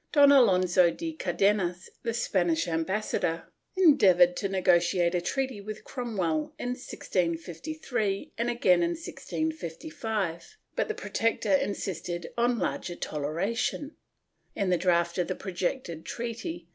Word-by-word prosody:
Don 285 -1 +7
Alonso 185 -9 +5
de 325 - -4
Car 190 - -3
denas, 185 -1 +1
the 230 - -1
Spanish 175 -7 +1
ambassador, 165 0 -1 0.3
endeavored 195 - +6
to 195 - -1
negotiate 175 -1 +3
a 175 - +1
treaty 260 +3 -2
with 215 +1 -7
Cromwell 185 - -2
in 245 - -3
1653 195 - -2
and 235 +1 -1
again 185 -7 +3
in 170 0 +1
1655, 220 - -4 0.2
but - - 0
the 435 - -3
Protector 210 0 0
insisted 175 -3 -2
on 240 0 +2
larger 175 -5 -2
toleration. 190 - -2 0.6
In 195 -3 0
the - - +5
draft 170 -1 +2
of 175 - +1
the 185 - -2
projected 180 - -3
treaty. 225 -8 -5
190 Hz, 125 wpm, -28 LUFS, 175-235 Hz, 0.6 s, Don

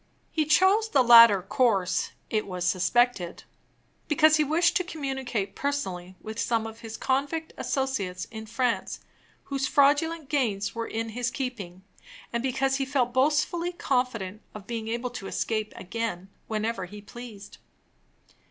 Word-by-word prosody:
He 310 -2 +1
chose 380 +8 +4
the 275 -8 +4
latter 230 -5 +8
course 195 -3 +1 0.2
it 215 -2 0
was 180 -2 -3
suspected, 185 +1 +1 0.6
because 310 +1 +5
he 305 - +3
wished 330 +4 +2
to 365 - 0
communicate 265 - -4
personally 190 -11 -3
with 220 +1 -7
some 230 -2 0
of 225 0 -8
his 225 -1 -8
convict 285 +5 -1
associates 220 -10 -2
in 220 -1 -8
France, 235 +2 -1 0.4
whose 275 -1 -2
fraudulent 295 +2 +3
gains 225 -9 0
were 230 0 -4
in 225 +1 -3
his 240 +2 -2
keeping, 200 -9 -5 0.5
and 235 - 0
because 265 +1 0
he 275 - 0
felt 265 -3 0
boastfully 305 +6 +1
confident 235 - -1
of 210 -2 -9
being 225 -1 -4
able 240 +2 -3
to 210 -5 -7
escape 215 0 -2
again, 195 -2 -4 0.2
whenever 215 -2 -2
he 205 +3 -10
pleased. 210 -1 -11
240 Hz, 145 wpm, -27 LUFS, 210-275 Hz, 0.6 s, latter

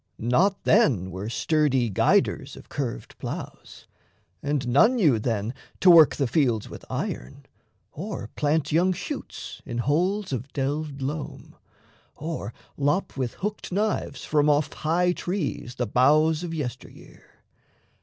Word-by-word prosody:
Not 180 - +1
then 120 - +3
were 95 +5 -5
sturdy 135 -3 +1
guiders - - +2
of - - -14
curved - - -4
ploughs, - - -7 0.6
And 140 -3 -1
none 215 - +5
knew 155 - +3
then 110 0 -2 0.3
to 185 - +7
work 160 -3 +8
the 140 - 0
fields 120 -6 +1
with - - -10
iron, 65 +3 -5 0.5
Or 170 - -6
plant 150 +1 +1
young 175 +4 +3
shoots 270 - -7
in 120 -3 -5
holes 175 - 0
of 130 +2 -4
delved 140 0 -2
loam, 145 +2 -5 0.6
Or 155 -9 -5 0.3
lop 145 +7 0
with 130 -3 -3
hooked 210 0 -4
knives 200 -8 -1
from 150 -1 +2
off 145 -1 +2
high 175 +3 +1
trees 175 -9 -3
The 125 - -1
boughs 150 +7 +3
of 175 - -4
yester 145 -8 -4
year. - - -18
145 Hz, 135 wpm, -25 LUFS, 125-170 Hz, 0.6 s, work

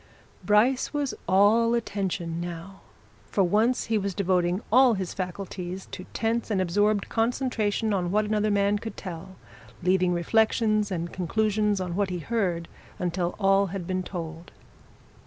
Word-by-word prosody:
Bryce 225 +9 +2
was 285 -3 -1
all 220 +5 +4
attention 190 -7 -2
now 175 +2 -7 0.5
for 195 - +2
once 215 +7 +2
he 225 -1 +1
was 195 -2 -3
devoting 180 0 +1
all 250 0 +6
his 190 -2 -4
faculties 185 0 -5
to 185 - -7
tense 230 +1 -1
and 205 -3 +1
absorbed 205 +3 +1
concentration 225 -3 0
on 180 -3 0
what 210 +3 +2
another 215 0 +1
man 200 0 +2
could 225 -2 -7
tell, 185 0 -8 0.5
leaving 185 0 +3
reflections 215 +3 +2
and 170 -2 -4
conclusions 210 +2 0
on 180 -2 -3
what 200 -1 0
he 180 - -3
heard 175 -3 -1 0.3
until 175 0 -2
all 195 -1 +3
had 185 -1 -5
been 185 +1 -1
told. 170 -2 -7
195 Hz, 145 wpm, -26 LUFS, 180-215 Hz, 0.5 s, all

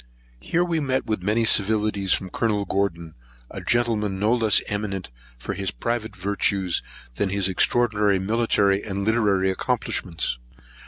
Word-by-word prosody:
Here 165 - 0
we 170 -2 0
met 130 -3 -1
with 110 -4 -2
many 105 +4 +1
civilities 105 -2 +2
from 95 -1 0
Colonel 105 -3 0
Gordon; 85 -5 -2 0.4
a - - -7
gentleman 110 -5 0
no 105 +4 +2
less 115 -4 +4
eminent 100 - -3 0.3
for - - -5
his 95 -1 -2
private 115 -2 -3
virtues 95 -1 0 0.4
than 100 - 0
his 100 -1 0
extraordinary 105 +1 +2
military 100 -1 +1
and 100 -1 -3
literary 100 -4 +2
accomplishments. 85 -6 -2
100 Hz, 140 wpm, -24 LUFS, 95-110 Hz, 0.4 s, less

